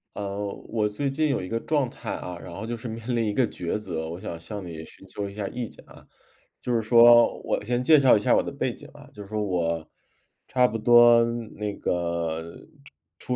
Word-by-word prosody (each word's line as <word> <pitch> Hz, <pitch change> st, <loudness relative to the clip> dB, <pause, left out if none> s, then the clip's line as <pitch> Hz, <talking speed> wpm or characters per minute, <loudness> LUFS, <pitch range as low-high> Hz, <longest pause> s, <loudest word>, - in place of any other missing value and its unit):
呃， 100 Hz, 0 st, -4 dB, 0.2 s
我 110 Hz, -2 st, 0 dB
最 140 Hz, +7 st, -2 dB
近 150 Hz, +3 st, 0 dB
有 135 Hz, -8 st, 0 dB
一 90 Hz, -, -6 dB
个 115 Hz, -, -2 dB
状 145 Hz, 0 st, 0 dB
态 -, -, -7 dB
啊， 90 Hz, -1 st, -5 dB
然 85 Hz, -, -10 dB
后 100 Hz, +5 st, -6 dB
就 120 Hz, -, -3 dB
是 115 Hz, -, -13 dB
面 115 Hz, +2 st, -4 dB
临 115 Hz, -, +1 dB
一 105 Hz, -, -1 dB
个 125 Hz, +1 st, +2 dB
抉 85 Hz, 0 st, -3 dB
择， 80 Hz, -6 st, -5 dB
我 85 Hz, +2 st, -6 dB
想 95 Hz, -4 st, -6 dB
向 100 Hz, +4 st, -8 dB
你 80 Hz, -2 st, -7 dB
寻 95 Hz, -, -15 dB
求 100 Hz, +2 st, -5 dB
一 -, -, -11 dB
下 100 Hz, -1 st, -4 dB
意 120 Hz, +1 st, -5 dB
见 -, -, -16 dB
啊。 -, -, -16 dB, 0.5 s
就 125 Hz, -, -2 dB
是 115 Hz, -, +2 dB
说 120 Hz, +1 st, +6 dB
我 -, -, -1 dB
先 120 Hz, +3 st, -1 dB
介 155 Hz, +5 st, +6 dB
绍 130 Hz, -5 st, +6 dB
一 -, -, 0 dB
下 105 Hz, -, +3 dB
我 -, -, +2 dB
的 -, -, -5 dB
背 -, -, -2 dB
景 -, -, -14 dB
啊， -, -, -14 dB
就 105 Hz, -, -9 dB
是 100 Hz, -, -15 dB
说 110 Hz, 0 st, -2 dB
我 85 Hz, -5 st, -1 dB, 0.6 s
差 125 Hz, -1 st, +4 dB
不 115 Hz, -, -3 dB
多 120 Hz, +1 st, +6 dB, 0.3 s
那 105 Hz, -1 st, -3 dB
个 85 Hz, -2 st, -2 dB, 0.8 s
出 125 Hz, -, -3 dB
105 Hz, 245 characters per minute, -25 LUFS, 90-120 Hz, 0.8 s, 说